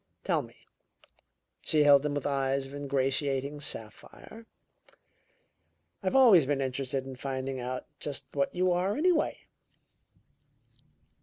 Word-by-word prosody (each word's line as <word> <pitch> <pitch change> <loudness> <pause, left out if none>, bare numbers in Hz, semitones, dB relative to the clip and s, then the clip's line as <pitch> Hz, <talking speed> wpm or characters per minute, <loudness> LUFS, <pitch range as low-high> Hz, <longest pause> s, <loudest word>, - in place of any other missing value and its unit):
Tell - - +1
me - - -14 0.6
" - - -38
she 155 -1 +2
held 140 -1 +6
him 150 -1 -1
with 145 - -3
eyes 135 -1 0
of 135 - -12
ingratiating 140 0 -1
sapphire 150 - -9 1.5
"I've 190 +2 -1
always 215 - +7
been 145 -1 0
interested 130 0 -2
in 135 -1 -7
finding 135 0 -4
out 125 +1 -4
just 145 -2 -4
what 140 -1 +1
you 180 0 +2
are, 185 +5 0
anyway." 335 0 +1
140 Hz, 125 wpm, -29 LUFS, 135-155 Hz, 1.5 s, always